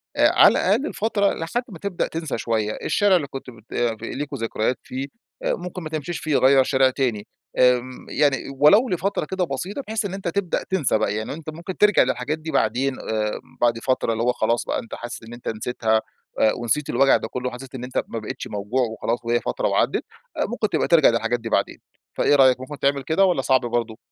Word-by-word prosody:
آآ - - +5
على - - +7
الأقل 215 +10 +2
الفترة 205 -2 0
لحد 235 +10 -2
ما 170 -5 -10
تبدأ 200 -3 -2
تنسى 160 -6 -4
شوية. 110 -2 -1
الشارع 205 -2 +3
اللي 155 -6 0
كنت 135 -1 -8
بت 115 -2 -14
آآ 120 -2 0
ف - - -23
ليكم 140 +4 -4
ذكريات 115 +1 -1
فيه، 135 +2 -5 0.4
آآ - - +1
ممكن 180 -1 -7
ما 155 - -5
تمشيش 160 +2 -4
فيه، 155 -3 +1
غيّر 135 0 +5
شارع 130 0 +3
تاني، 125 -6 -2 0.3
آمم 125 0 +2
يعني 140 -3 +2 0.2
ولو 205 - +6
لفترة 190 -1 -1
كده 190 -1 0
بسيطة، 180 - -4
بحيث 220 -1 -2
إن 190 - -4
أنت 195 -2 -5
تبدأ 180 +1 -1
تنسى 170 -12 +2
بقى، 105 -1 0
يعني 110 +5 -3
أنت 155 0 -8
ممكن 170 +4 -7
ترجع 210 -2 +5
للحاجات 130 +5 -2
دي 160 +1 -6
بعدين، 135 -1 +1
آآ 110 -1 -2 0.2
بعد 120 -1 +3
فترة 130 -2 0
اللي 115 +1 -1
هو 125 - +3
خلاص 115 +2 0
بقى - - -1
أنت 115 - -8
حاسس 120 -1 -7
إن 115 +1 -10
أنت 120 - -10
نسيتها، 110 0 0 0.4
آآ 110 - +4
ونسيت 130 +5 -1
الوجع 135 +3 +4
ده - - -5
كله، 125 +2 -3
وحسيت 130 +2 -10
إن 125 - -6
أنت 125 - -2
ما 115 - -4
بقيتش 110 - -6
موجوع 105 +6 -2
وخلاص 115 0 -1
وهي 120 0 +2
فترة - - -1
وعدت، - - +1 0.3
آآ - - +1
ممكن 220 -1 -1
تبقى - - 0
ترجع 165 -4 +6
للحاجات 115 +1 0
دي 115 0 -6
بعدين. - - 0 0.4
فإيه 145 - +3
رأيك 130 -2 +5
ممكن 140 +3 -8
تعمل 140 -1 +1
كده، 170 +8 +3
والّا 175 -8 +2
صعب 130 -1 +3
برضه؟ 120 -2 -2
130 Hz, 215 wpm, -23 LUFS, 115-165 Hz, 0.4 s, على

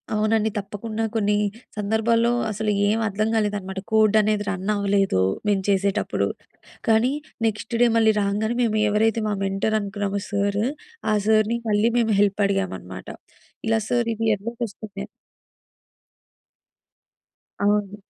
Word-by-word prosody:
అవునండి. 215 +1 +2
తప్పకుండా 215 +2 -4
కొన్ని 210 -1 +2 0.4
సందర్భాల్లో 225 +3 +2 0.2
అసలు 215 0 -1 0.2
ఏం 220 +2 +1
అర్థం 215 +2 -1
కాలేదన్నమాట. 205 -3 -1
కోడ్ 215 -1 +4
అనేది 210 0 0
రన్ 195 +1 -3
అవ్వలేదు 200 - +1 0.3
మేము 195 -2 +2
చేసేటప్పుడు. 195 0 +1 0.6
కానీ 225 +4 +4 0.3
నెక్స్ట్ 220 +2 -2
డే 240 - +6
మళ్ళీ 220 -1 +5
రాంగానే 210 +4 -1
మేము 215 -2 +1
ఎవరైతే 220 +2 +2
మా 205 - 0
మెంటర్ 195 +3 0
అనుకున్నామో 200 0 -3
సారు, 200 +2 0 0.5
ఆ - - +3
సార్‌ని 220 +1 +3
మళ్ళీ 210 +2 +3
మేము 225 -2 +2
హెల్ప్ 205 0 +2
అడిగామన్నమాట. 95 - -3 0.6
ఇలా 225 0 +3
సార్ 240 -1 +1
ఇది 225 +1 -3
ఎర్రర్ 230 +4 -7
వస్తుంది 205 0 -11
అని. - - -11 2.6
అవును. 205 -1 +1
210 Hz, 125 wpm, -23 LUFS, 200-220 Hz, 2.6 s, డే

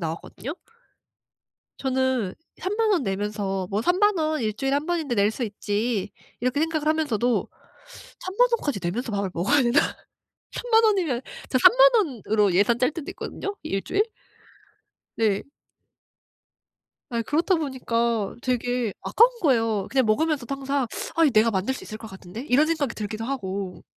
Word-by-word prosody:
나왔거든요? 170 - -5 1.2
저는 260 -6 0 0.3
30,000 425 +4 0
원 360 - +2
내면서 195 -2 -2
'뭐 205 +2 0
30,000 375 - +3
원 310 -2 0
1 215 -1 0
주일에 270 +3 -1
1 290 +3 -1
번인데 325 -7 -1
낼 205 0 +3
수 245 - -5
있지.' 210 +1 -2 0.3
이렇게 255 +4 0
생각을 315 -1 -1
하면서도 250 -7 +1 0.7
'30,000 405 +7 +2
원까지 290 - 0
내면서 220 +7 -2
밥을 200 -2 -1
먹어야 265 +12 +3
되나?' 240 +3 +4 0.7
30,000 455 -2 +3
원이면 360 - +2 0.3
저 255 - +2
30,000 - - +7 0.4
원으로 210 -2 +3
예산 205 +5 +3
짤 255 +2 +2
때도 310 -1 -6
있거든요 400 +1 -5
1 195 -11 -2
주일? 405 - +2 1.1
네. 210 -3 +1 1.7
아 235 -1 -1
그렇다 330 - +1
보니까 235 -7 -1
되게 245 -3 -1
아까운 470 +3 +5
거예요. 225 - +2
그냥 260 -3 +2
먹으면서도 275 +2 +1
항상 275 -1 -1 0.3
'아 330 - +4
이 300 - +5
내가 225 0 +4
만들 200 +6 -1
수 - - -9
있을 215 - -8
것 225 - -9
같은데?' 190 +4 -9
이런 275 +5 +4
생각이 310 -6 -1
들기도 215 +1 -4
하고. 195 -7 -4
250 Hz, 280 characters per minute, -25 LUFS, 215-310 Hz, 1.7 s, 30,000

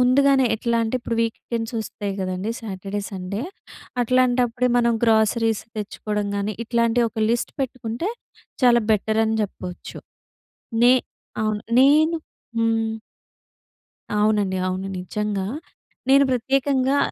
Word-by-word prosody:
ముందుగానే 265 +1 +4
ఎట్లా 235 +1 0
అంటే, 225 +3 -1
ఇప్పుడు 230 -1 -3
వీకెండ్స్ 230 0 -3
వస్తాయి 205 -2 -5
గదండీ, 185 +3 -2
సాటర్‌డే, 200 -1 -5
సండే. 195 +4 -4 0.6
అట్లాంటప్పుడే, 250 0 +2
మనం 235 -1 +3
గ్రోసరీస్ 225 0 +2 0.2
తెచ్చుకోడం 210 0 -3
గాని, 200 +1 -2
ఇట్లాంటి 235 0 +2
ఒక 220 -1 -1
లిస్ట్ 235 0 -1
పెట్టుకుంటే, 255 - -3 0.5
చాలా 240 -2 +5
బెటర్ 220 +1 +1
అని 220 - 0
జెప్పొచ్చు. 180 -3 -7 0.9
నే 245 +1 +7 0.5
అవును. 215 -1 -1 0.2
నేను 310 +5 +5 0.4
హ్మ్. 225 -1 +1 1.3
అవునండి, 210 -3 +2
అవును 190 +1 -3
నిజంగా. 200 +1 -2 0.6
నేను 275 +1 +6
ప్రత్యేకంగా... 270 +2 +1
225 Hz, 110 wpm, -23 LUFS, 210-250 Hz, 1.3 s, నే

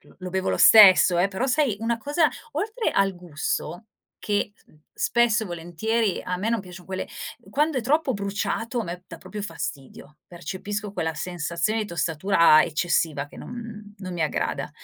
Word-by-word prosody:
lo - - -22
lo 185 0 -6
bevo 190 +1 -1
lo - - 0
stesso, 190 -4 +8
eh. 180 +3 +3
Però, 200 +7 -2
sai, 270 -5 +1
una 230 +1 0
cosa, 295 +6 +2 0.2
oltre 440 +1 -1
al 195 -1 +1
gusto, 175 +3 -4 0.3
che 205 -1 -1 0.4
spesso 235 -2 +2
e - - -7
volentieri 185 +5 -1
a 180 - -2
me 200 +5 -2
non 230 -2 +1
piacciono 180 -2 -12
quelle 190 0 -4 0.4
quando 300 -2 +1
è - - -1
troppo 285 +4 +1
bruciato, 205 +4 -2
a - - -3
me 180 +1 -7
dà 165 - -9
proprio 210 +4 -7
fastidio. 145 -5 -7
Percepisco 200 +3 -5
quella 160 -4 -2
sensazione 170 +5 -2
di 215 - -3
tostatura 170 -2 +4
eccessiva 155 -2 0
che - - -16
non 225 -3 -9
non 185 -2 -6
mi 175 -2 -2
aggrada. 155 - -2
195 Hz, 170 wpm, -24 LUFS, 175-225 Hz, 0.4 s, stesso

